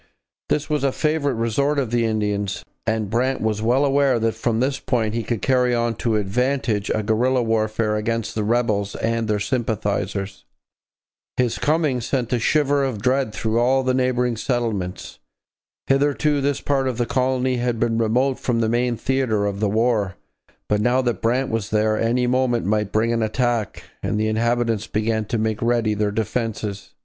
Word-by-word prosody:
This 150 - 0
was 150 -3 -1
a 135 - +2
favourite 150 -2 0
resort 130 +6 0
of 130 -5 -1
the 120 -1 +2
Indians, 105 -3 -1 0.2
and 110 -2 0
Brant 130 +3 +1
was 110 -1 -1
well 125 +5 +3
aware 140 -2 +3
that 115 0 0
from 115 -2 -1
this 135 +2 0
point 110 -4 -1
he 115 - -1
could 115 0 -3
carry 125 -2 +2
on 120 0 0
to 115 -2 0
advantage 110 +1 0
a 110 - 0
guerrilla 125 +4 +2
warfare 110 -1 0
against 115 +1 -2
the 110 - -1
rebels 105 -3 0
and 115 0 -1
their 105 -1 0
sympathizers. 100 - -2 0.9
His 125 -2 0
coming 150 -5 +1
sent 125 0 -1
a 120 - +2
shiver 145 +2 +2
of 130 -6 -2
dread 130 -2 +1
through 110 +1 -1
all 130 +2 +3
the 130 0 +1
neighbouring 125 -2 +1
settlements. 110 -8 -3 0.7
Hitherto 145 +1 +2
this 140 0 0
part 135 -2 0
of 125 -3 -2
the 120 - +1
colony 130 0 0
had 120 -1 -1
been 115 -1 +1
remote 125 +4 +1
from 120 -2 0
the 110 -1 +1
main 120 0 0
theatre 125 -6 0
of 100 -1 -2
the 105 -1 +1
war, 110 -3 +1 0.5
but 105 0 +1
now 125 +3 +2
that 120 -2 -1
Brant 125 +3 +1
was 110 -2 -2
there 110 0 +2
any 120 +3 +1
moment 125 -2 +1
might 105 0 0
bring 115 +2 +1
an 115 - 0
attack, 115 0 -1 0.2
and 105 - -1
the 110 - +1
inhabitants 115 -1 0
began 110 0 -1
to 115 - -2
make 110 -1 -1
ready 115 -2 +1
their 105 0 0
defences. 105 -2 -3
115 Hz, 180 wpm, -22 LUFS, 110-130 Hz, 0.9 s, well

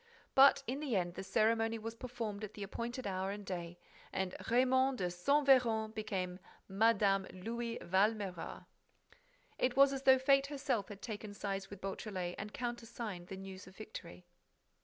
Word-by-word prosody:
But, 275 +1 +7
in 265 +2 -2
the 285 -7 -1
end, 175 -2 0
the 190 - -6
ceremony 225 +2 +2
was 225 +1 -5
performed 230 -4 -5
at 210 0 -6
the 205 - -5
appointed 235 +5 -4
hour 190 -1 -1
and 205 0 -5
day 175 -2 -5 0.3
and 190 -1 -2 0.2
Raymonde 260 +2 +4
de 180 -4 -1
Saint 280 +12 +2
Véran 225 -5 +4
became 190 -5 -3 0.3
Mme. 195 -1 +3
Louis 230 +5 -4
Valméras. 195 -1 0 0.9
It 250 0 +1
was 275 0 +7
as 270 - -3
though 265 -1 +7
Fate 275 +1 +4
herself 270 -8 -1
had 200 -1 -10
taken 210 -2 -6
sides 195 -1 -3
with 200 -2 -10
Beautrelet 190 -2 -4
and 210 +1 -5
countersigned 235 -6 -5
the 190 - -7
news 190 -1 -9
of 185 - -14
victory. 180 -5 -9
215 Hz, 160 wpm, -35 LUFS, 190-245 Hz, 0.9 s, But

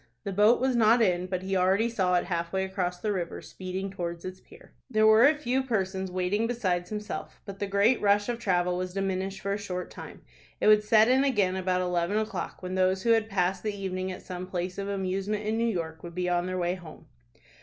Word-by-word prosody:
The 200 - -3
boat 210 +5 +5
was 260 0 +1
not 230 +1 +5
in, 180 -5 +2
but 185 0 -3
he 195 0 -2
already 190 +5 +3
saw 190 -6 +1
it 175 - +1
halfway 175 +1 -2
across 185 -2 -3
the 215 - -1
river, 175 -3 -3
speeding 190 +1 -6
towards 170 -3 -5
its 185 0 -6
pier. - - -17 0.2
There 215 -3 +3
were 220 +4 +7
a 305 +1 +3
few 265 -2 0
persons 190 -6 -2
waiting 185 +5 0
besides 185 -7 -1
himself, 210 0 -6
but 200 -1 -8
the 205 - -2
great 200 +5 +3
rush 205 0 +3
of 240 -1 -2
travel 180 -4 +1
was 185 0 -4
diminished 195 0 -2
for 200 0 -1
a 205 - -3
short 180 -3 -5
time. - - -10 0.4
It - - -1
would 210 0 +6
set 215 +1 +5
in 260 +2 +4
again 205 -9 +2
about 185 -1 0
eleven 180 +2 0
o'clock 215 -3 -4
when 185 0 -4
those 185 0 +1
who 230 - +3
had 225 -1 +3
passed 190 -1 0
the 210 -1 -3
evening 185 -1 -3
at 185 - -8
some 180 0 -6
place 180 0 -4
of 200 0 -3
amusement 195 +2 -2
in 215 +1 0
New 230 0 +2
York 160 -5 -4
would 170 -1 -9
be 180 0 -1
on 175 0 0
their 185 0 -3
way 175 0 0
home. 175 -4 -11
190 Hz, 230 wpm, -28 LUFS, 180-215 Hz, 0.4 s, were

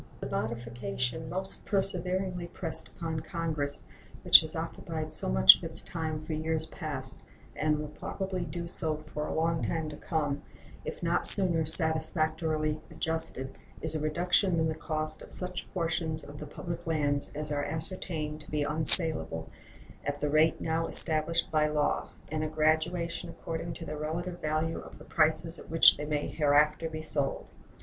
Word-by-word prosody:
The - - -6
modification 120 +6 -4
most 190 +2 -5
perseveringly 185 -2 -3
pressed 170 -1 -6
upon 165 -2 -6
Congress, 155 -3 -4 0.4
which - - +8
has - - -9
occupied - - -6
so - - -5
much 65 0 +8
of - - -14
its - - +1
time 155 -2 -5
for 155 - -5
years 160 +1 -2
past, 140 -7 -5 0.3
and 150 0 0
will 150 0 -5
probably 190 +3 -5
do 170 0 -6
so 155 -3 -5
for 150 0 -4
a - - -5
long 165 0 -1
time 160 -2 -3
to 150 - -9
come, 150 -2 -3 0.4
if - - -8
not - - 0
sooner 170 -5 +2
satisfactorily 160 -1 -1
adjusted, 160 -4 -3 0.2
is 160 -1 -2
a 155 - -3
reduction 175 +3 0
in 160 - +1
the - - -2
cost 155 -1 -5
of - - -13
such 180 -1 -7
portions 165 -3 -2
of 145 0 -11
the 150 - -8
public 170 +3 -8
lands 145 -3 -1
as 150 0 -6
are 145 -1 -2
ascertained 155 -1 -5
to - - -13
be 150 -1 -2
unsalable 155 - +10 0.5
at 145 0 -4
the 150 0 -2
rate 155 +2 +2
now 165 0 -2
established 165 +1 +2
by 155 -1 +2
law, 150 -1 -1 0.2
and 155 0 -2
a - - -2
graduation 160 +3 -1
according 165 0 -6
to 165 - -8
their 155 - -6
relative 175 +3 -5
value 155 +1 -2
of - - -13
the - - -15
prices 160 +1 0
at - - -14
which 165 0 +6
they 150 - -5
may 150 -1 -2
hereafter 150 +2 +1
be 155 0 -7
sold. 145 -3 -3
155 Hz, 170 wpm, -28 LUFS, 150-165 Hz, 0.5 s, unsalable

